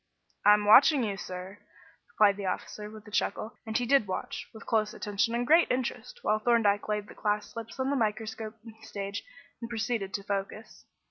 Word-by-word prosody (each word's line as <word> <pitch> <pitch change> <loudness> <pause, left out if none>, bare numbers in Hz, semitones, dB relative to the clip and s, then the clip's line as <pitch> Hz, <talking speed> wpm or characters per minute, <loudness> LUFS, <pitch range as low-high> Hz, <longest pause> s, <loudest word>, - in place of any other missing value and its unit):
"I'm 210 0 +6
watching 260 +5 +7
you, 205 -3 -1
sir," 185 +1 -7 0.5
replied 205 - +5
the 200 -1 -4
officer, 210 +3 -4
with 215 -1 -12
a - - -11
chuckle; 210 +1 -1
and 220 - 0
he 245 - -1
did 270 -4 +3
watch, 185 - -4
with 220 - -12
close 220 -1 0
attention 210 +3 -1
and 240 +1 0
great 325 +6 +5
interest, 260 - -3
while 215 - +2
Thorndyke 215 -3 +2
laid 210 -1 -2
the - - -11
glass 210 0 -1
slips 230 +1 -8
on 260 +1 0
the - - +1
microscope 220 -1 -2 0.3
stage 200 -1 -5 0.4
and 230 - -5
proceeded 225 -3 -2
to 200 - -4
focus. 200 +2 -5
215 Hz, 185 wpm, -29 LUFS, 205-235 Hz, 0.5 s, watching